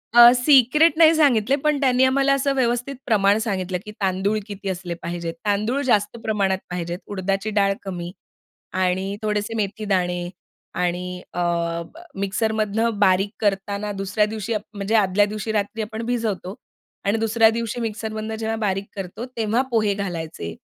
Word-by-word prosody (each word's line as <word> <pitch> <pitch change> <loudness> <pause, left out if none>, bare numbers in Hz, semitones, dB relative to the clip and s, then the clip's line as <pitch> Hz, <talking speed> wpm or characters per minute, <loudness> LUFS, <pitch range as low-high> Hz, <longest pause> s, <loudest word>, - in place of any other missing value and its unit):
अ, 240 0 +10
secret 280 +4 +5
नाही 325 -1 +7
सांगितले. 270 -5 +3
पण 300 -2 +2
त्यांनी 255 -1 +3
आम्हाला 275 +1 +3
असं 275 0 +1
व्यवस्थित 245 +1 0
प्रमाण 205 -3 +3
सांगितलं 185 -3 -2
की 210 - -7
तांदूळ 195 +2 +1
किती 200 -1 -5
असले 180 -1 -4
पाहिजेत? 170 -1 -4
तांदूळ 215 +6 +1
जास्त 215 -3 +1
प्रमाणात 200 -3 +1
पाहिजेत, 175 0 -4
उडदाची 195 +1 -2
डाळ 195 -1 +4
कमी 175 -3 -5 0.7
आणि 190 +2 0
थोडेसे 210 +1 -1
मेथी 215 +1 -2
दाणे 180 -3 0 0.5
आणि 180 +1 -3
अ, 175 - -2 0.8
मिक्सरमधनं 215 +2 0
बारीक 195 0 +3
करताना 200 0 -1
दुसऱ्या 200 +2 +1
दिवशी 215 +1 -4
आ - - +2 0.2
म्हणजे 205 +2 -1
आदल्या 205 -1 +4
दिवशी 215 +1 -4
रात्री 215 +1 -1
आपण 220 +1 -5
भिजवतो. 220 -6 -2 0.5
आणि 200 +3 +2
दुसऱ्या 225 0 +4
दिवशी 230 +1 -3
मिक्सरमधनं 220 0 -4
जेव्हा 220 0 -2
बारीक 195 -2 -1
करतो. 195 +4 -6
तेव्हा 225 +2 +1
पोहे 215 -3 +2
घालायचे. 165 - -5
210 Hz, 150 wpm, -22 LUFS, 190-225 Hz, 0.8 s, अ